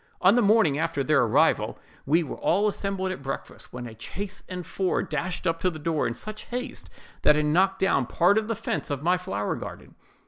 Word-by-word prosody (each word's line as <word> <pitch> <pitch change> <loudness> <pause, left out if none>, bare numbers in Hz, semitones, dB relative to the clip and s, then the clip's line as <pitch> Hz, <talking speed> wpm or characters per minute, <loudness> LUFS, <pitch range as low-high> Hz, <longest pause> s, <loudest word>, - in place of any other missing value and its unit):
On 190 +2 +6
the 245 - +4
morning 205 -9 +4
after 160 -4 0
their 140 0 +3
arrival, 115 -3 +2 0.3
we 165 +5 +4
were 145 - -6
all 200 +4 +2
assembled 195 -2 -2
at 185 - -6
breakfast, 135 0 -6
when 125 0 -6
a 115 -2 -9
chaise 195 - -6
and 180 -1 -5
four 190 -2 0
dashed 180 +1 -3
up 165 -1 +1
to 185 - +2
the 165 - -7
door 155 0 0
in 115 - -3
such 215 - -7
haste 250 +3 -5 0.3
that 150 - +6
it 150 - +2
knocked 190 +6 +3
down 140 -10 +2
part 190 +10 +4
of 215 - -5
the 230 - -1
fence - - -3
of 145 -1 -3
my 175 +2 +4
flower 180 - -2
garden. - - -8
175 Hz, 215 wpm, -26 LUFS, 150-195 Hz, 0.3 s, On